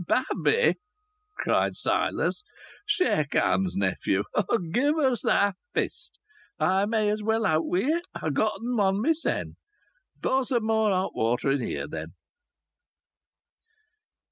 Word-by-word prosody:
"Babby!" 350 - +2 0.6
cried - - +1
Silas. - - -1 0.4
"Shake 365 - +1
hands, 190 -2 +2
nephew. 95 0 0 0.5
Give 285 - +2
us 265 -6 +1
thy 200 0 +2 0.2
fist. - - -3 0.4
I 190 +2 +2
may 215 -1 +1
as 210 0 -2
well 220 +1 +1
out 160 -3 +1
wi' 180 - +1
it. 335 +6 0
I've 155 - -2
gotten 220 - -1
one 195 -2 +2
mysen. 320 +8 -1 0.6
Pour 265 0 +1
some 240 -3 -1
more 220 -1 +2
hot 190 -1 0
water 120 +4 +1
in 140 -1 +1
here, - - -3
then." - - -7
215 Hz, 120 wpm, -26 LUFS, 185-260 Hz, 0.6 s, Babby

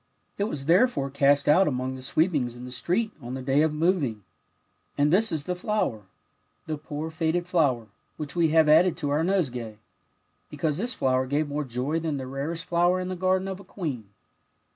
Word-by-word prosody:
It 200 - +2
was 145 -10 -5
therefore 170 - +3
cast 140 0 +3
out 185 +6 +5
among 130 -1 -2
the 130 - -8
sweepings 140 -3 0
in 125 - -8
the 125 - -8
street 180 - -1
on 120 +1 -6
the 130 - -5
day 135 +2 +3
of 160 0 +2
moving; 150 - 0 0.7
and 145 +2 +3
this 220 +3 +3
is 155 -3 -2
the 180 - -2
flow^er, 180 - -2 0.6
the 155 -2 -4
poor 150 +1 -5
faded 165 +2 0
flower, 140 -10 +1 0.3
which 145 -2 -6
we 170 -2 +3
have 160 0 +4
added 165 +3 +5
to 145 -5 -2
our 150 +3 +1
nosegay, 125 - -1 0.7
because 150 +1 -2
this 245 +4 -1
flower 130 0 +1
gave 145 +3 0
more 150 +1 -2
joy 130 +5 -2
than 155 -3 -2
the 130 - -5
rarest 145 +6 -4
flower 175 +1 +2
in 185 0 -3
the 185 - -3
garden 185 +1 +1
of 190 -1 -5
a - - -11
queen." 155 - -5
155 Hz, 195 wpm, -26 LUFS, 135-175 Hz, 0.7 s, out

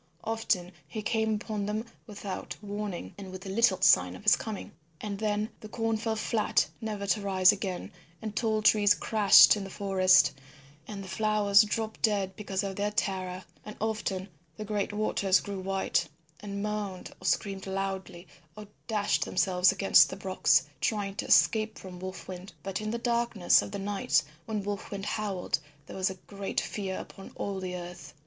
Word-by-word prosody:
Often 220 -5 -1 0.2
he 215 -2 -6
came 220 0 +1
upon 210 -1 -3
them 215 +2 -2 0.2
without 205 -2 -6
warning 205 - -5
and 190 -2 -8
with 185 +1 -9
little 195 0 +2
sign 90 - +5
of - - -12
his - - +6
coming. 215 -3 -6 0.3
And 200 -2 -5
then 210 0 0
the 215 - -10
corn 225 0 -1
fell 220 0 -2
flat 215 0 +1 0.2
never 210 -2 -4
to 205 +2 +1
rise 190 -1 +5
again, 195 -1 -4 0.3
and 215 -1 -6
tall 220 -2 0
trees 205 -2 +5
crashed 215 -1 +7
in 205 - -4
the 195 - -7
forest, 190 -1 +4 0.6
and 200 -2 -6
the - - -9
flowers 210 +1 +4
dropped 220 +1 -2
dead 200 -4 +1
because 195 -2 -3
of 195 -1 -4
their 205 +1 0
terror; 185 -3 -2 0.2
and 210 - -9
often 210 -3 -2 0.3
the 215 - -5
great 205 -1 -1
waters 205 -2 +2
grew 200 -1 -6
white 190 -3 -1 0.3
and 200 -1 -5
moaned 210 -3 -4
or - - -10
screamed 195 +2 -1
loudly 190 -2 -4 0.3
or 210 - -8 0.2
dashed 210 -3 +1
themselves 185 -1 +3
against 195 0 +5
the - - -6
rocks 190 -1 +3 0.2
trying 205 0 -1
to - - -3
escape 220 0 +4
from 180 -2 -10
Wolf 185 +1 -7
Wind. 185 0 -8
And 195 +1 -3
in 215 - -3
the 230 - -2
darkness 235 -5 +3
of - - -6
the 205 - -4
night 200 0 +1 0.2
when 215 -2 -2
Wolf 205 -1 -4
Wind 200 -1 -5
howled, 205 -6 -2 0.3
there - - -10
was 190 0 +1 0.2
great 200 -1 -3
fear 190 -3 -4
upon 195 - -10
all 195 -1 -3
the 185 -1 -4
earth. 175 -4 -9
200 Hz, 175 wpm, -29 LUFS, 190-215 Hz, 0.6 s, crashed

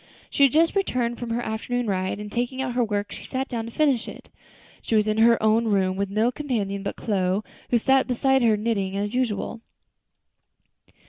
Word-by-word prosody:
She - - -2
had 275 -2 +7
just 330 +4 +3
returned 245 -11 0
from 240 - -5
her 235 +1 -1
afternoon 245 +3 -2
ride, 190 -1 -1
and 210 0 -7
taking 245 +3 -2
out 265 -2 -2
her 245 0 +2
work 205 -2 -2
she - - -8
sat 265 +1 -3
down 230 -3 -4
to 230 - -8
finish 270 -4 +1
it. - - -10 0.5
She 225 - -1
was 215 0 +3
in 215 +1 0
her 230 +1 +6
own 220 +2 +3
room, 190 -3 +1
with 200 0 -2
no 215 +4 +1
companion 225 -9 -3
but 200 - -4
Chloe, 195 -2 -1 0.3
who 240 - +3
sat 265 +3 +3
beside 265 +1 +2
her 225 -3 +3
knitting 200 -3 -1
as 205 +1 -2
usual. 230 -3 -2
230 Hz, 200 wpm, -24 LUFS, 205-250 Hz, 0.5 s, had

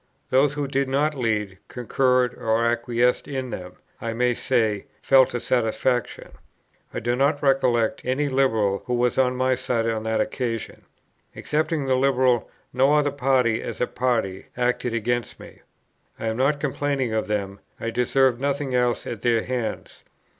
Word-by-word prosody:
Those 135 +2 +4
who 145 -1 -2
did 135 0 -1
not 145 +3 +1
lead, 105 -7 -2
concurred 125 0 +1
or 115 +1 0
acquiesced 120 +1 +1
in 130 -3 -4
them, 90 0 -7 0.3
I 115 -1 -3
may 125 +1 +1
say, 110 -5 0 0.2
felt 130 -2 +5
a - - 0
satisfaction. 120 +1 -1 0.6
I - - -4
do 120 +2 0
not 140 +3 +1
recollect 125 -5 +2
any 130 +4 0
Liberal 110 -8 +1
who 125 - 0
was 120 +1 +1
on 125 -1 +2
my 130 0 +2
side 120 -2 -1
on 110 -1 -1
that 110 0 0
occasion. 115 -4 -3 0.5
Excepting 155 -1 -1
the 130 - +1
Liberal, 130 -3 +2 0.2
no 135 +4 +4
other 145 -1 +2
party, 130 -4 +1
as - - -6
a - - +2
party, 115 -8 -1
acted 125 -1 0
against 120 +1 -2
me. - - -13 0.6
I - - -4
am 110 - -3
not 140 +3 +2
complaining 140 -4 -1
of 110 - -1
them; 100 -2 -3 0.2
I 115 - -3
deserved 125 +1 +2
nothing 140 -1 -1
else 125 -1 +1
at 115 -5 -6
their 115 -2 +2
hands. 125 -3 -4
125 Hz, 160 wpm, -24 LUFS, 115-135 Hz, 0.6 s, felt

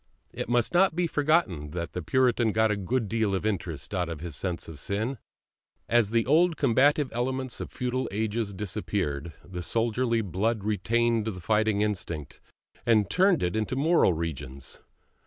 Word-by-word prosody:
It - - -4
must 120 +3 +2
not 180 -1 +4
be 175 0 +1
forgotten 145 - +1
that 85 -2 -4
the 90 - -3
Puritan 120 +3 +2
got 110 0 +3
a - - +1
good 110 +4 -1
deal 110 -2 0
of 95 - -3
interest 90 -6 -3
out 90 -3 -1
of 80 -3 -5
his 80 -2 -6
sense 90 -3 -3
of 80 -3 -9
sin; 110 - -2 0.7
as 120 -3 +3
the 115 0 +2
old 165 +4 +3
combative 140 +2 +3
elements 130 +1 -2
of - - -5
feudal 125 +1 -2
ages 110 0 -2
disappeared, 90 -6 -3
the 90 -1 -6
soldierly 115 +4 +1
blood 105 +3 -1
retained 110 +2 +1
the 105 -5 -4
fighting 105 +2 +1
instinct, 90 -8 -3 0.4
and 110 -4 +3
turned 185 -2 +3
it 90 +2 0
into 110 +3 -1
moral 150 - +3
regions. 70 -5 -6
110 Hz, 165 wpm, -27 LUFS, 90-125 Hz, 0.7 s, not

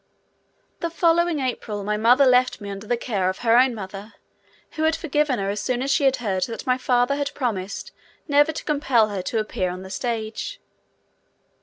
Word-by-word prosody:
The 335 - -2
following 335 -1 +2
April 220 -5 -3
my 210 +1 -1
mother 240 +6 +5
left 250 0 +3
me 200 -1 -7
under 200 +2 -8
the 240 - +1
care 200 -6 -1
of 185 - -4
her 230 0 +5
own 250 0 +4
mother, 200 +1 -8 0.6
who 310 - -5
had 320 0 +3
forgiven 295 -4 0
her 195 0 -1
as 205 - -3
soon 255 0 -1
as 275 - -1
she 285 - +2
had 265 -1 +4
heard 195 -7 -1
that 230 - -7
my 255 - +3
father 245 +1 +2
had 285 0 -2
promised 210 -7 -3 0.4
never 290 +1 +4
to 315 - -6
compel 270 -7 +2
her 200 -2 -3
to 225 - -3
appear 210 -4 -1
on 180 +1 -6
the 190 - -10
stage. 230 - -4
240 Hz, 195 wpm, -23 LUFS, 205-280 Hz, 0.6 s, mother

